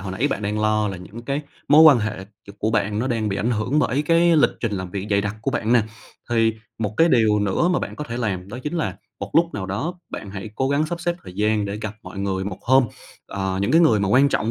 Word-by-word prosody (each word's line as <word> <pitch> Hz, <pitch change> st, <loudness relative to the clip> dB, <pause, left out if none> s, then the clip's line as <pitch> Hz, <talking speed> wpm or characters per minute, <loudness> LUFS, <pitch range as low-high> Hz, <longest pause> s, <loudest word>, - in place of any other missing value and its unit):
hồi 95 Hz, 0 st, -5 dB
nãy 130 Hz, +9 st, 0 dB
bạn -, -, -3 dB
đang 105 Hz, +1 st, -1 dB
lo 110 Hz, 0 st, +1 dB
là 95 Hz, -, -5 dB
những 100 Hz, +6 st, -10 dB
cái 140 Hz, +3 st, -2 dB, 0.3 s
mối 150 Hz, +2 st, +8 dB
quan 150 Hz, -6 st, +8 dB
hệ 110 Hz, -3 st, -3 dB
c 105 Hz, 0 st, -17 dB
của 110 Hz, -, 0 dB
bạn 105 Hz, -1 st, 0 dB
nó 125 Hz, -, -1 dB
đang 115 Hz, -4 st, -1 dB
bị 95 Hz, -, -2 dB
ảnh 115 Hz, -, 0 dB
hưởng 120 Hz, +6 st, 0 dB
bởi 140 Hz, +1 st, +1 dB
cái 165 Hz, +1 st, +4 dB
lịch 150 Hz, -, +5 dB
trình 115 Hz, -3 st, -1 dB
làm 95 Hz, -2 st, -4 dB
việc 100 Hz, +1 st, -4 dB
dày 100 Hz, 0 st, +3 dB
đặc 105 Hz, +1 st, -3 dB
của 135 Hz, -, 0 dB
bạn 115 Hz, -2 st, 0 dB
nè. 120 Hz, -3 st, +5 dB, 0.5 s
Thì 115 Hz, -1 st, +3 dB, 0.3 s
một 105 Hz, -1 st, -2 dB
cái 165 Hz, +1 st, +5 dB
điều 110 Hz, -6 st, +3 dB
nữa 105 Hz, -, +1 dB
mà 180 Hz, -, +2 dB
bạn -, -, -6 dB
có 150 Hz, -, -5 dB
thể 120 Hz, -2 st, -5 dB
làm 100 Hz, -6 st, -3 dB
đó 120 Hz, +4 st, -7 dB
chính 150 Hz, +3 st, -4 dB
là 105 Hz, -, -2 dB, 0.2 s
một 100 Hz, 0 st, -5 dB
lúc 170 Hz, +1 st, +3 dB
nào 95 Hz, -2 st, -4 dB
đó 130 Hz, -, -3 dB, 0.2 s
bạn 100 Hz, -, -7 dB
hãy 100 Hz, +2 st, -7 dB
cố 130 Hz, +3 st, 0 dB
gắng 145 Hz, +2 st, +1 dB
sắp 170 Hz, +1 st, -5 dB
xếp 175 Hz, 0 st, -1 dB
thời 90 Hz, -, -10 dB
gian 105 Hz, +1 st, +1 dB
để 100 Hz, 0 st, -4 dB
gặp 110 Hz, -1 st, -5 dB
mọi 100 Hz, -, -9 dB
người 95 Hz, -1 st, -2 dB
một 100 Hz, -2 st, -5 dB
hôm. 130 Hz, +1 st, +4 dB, 0.4 s
Ờ, 95 Hz, -1 st, -3 dB
những 110 Hz, -, 0 dB
cái 165 Hz, -, +6 dB
người 115 Hz, -11 st, +4 dB
mà 100 Hz, -, 0 dB
quan 135 Hz, +5 st, +5 dB
trọng 110 Hz, -4 st, 0 dB
110 Hz, 280 wpm, -22 LUFS, 100-135 Hz, 0.5 s, mối